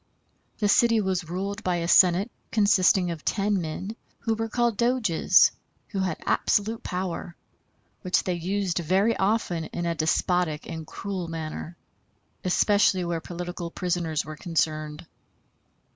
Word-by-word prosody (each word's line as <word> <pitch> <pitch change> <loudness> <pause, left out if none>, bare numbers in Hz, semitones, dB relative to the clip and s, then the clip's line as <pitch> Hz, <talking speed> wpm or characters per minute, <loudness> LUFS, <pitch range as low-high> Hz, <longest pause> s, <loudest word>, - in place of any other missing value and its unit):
The 210 - +1
city 230 +2 +4
was 185 -4 -1
ruled 200 +5 -4
by 180 -1 +1
a 170 -1 -2
Senate 185 +5 +5 0.2
consisting 190 -4 +3
of 160 -3 -7
ten 200 -2 0
men, 180 +7 -5 0.3
who 225 - 0
were 225 0 -3
called 235 0 +1
Doges, 235 -7 +4 0.4
who 200 - -3
had 185 -4 -1
absolute 220 +2 +1
power, 180 -1 -4 0.7
which 180 -1 +1
they 185 - -1
used 180 +1 -1
very 190 +7 +2
often 190 -5 0
in 175 - -4
a 170 - 0
despotic 160 0 0
and 160 -1 -6
cruel 190 -3 -5
manner, 165 +1 -6 0.7
especially 185 0 +3
where 170 -1 -2
political 175 0 -6
prisoners 170 -4 -2
were 155 +1 -7
concerned. 155 -1 -2
180 Hz, 135 wpm, -26 LUFS, 170-200 Hz, 0.7 s, Senate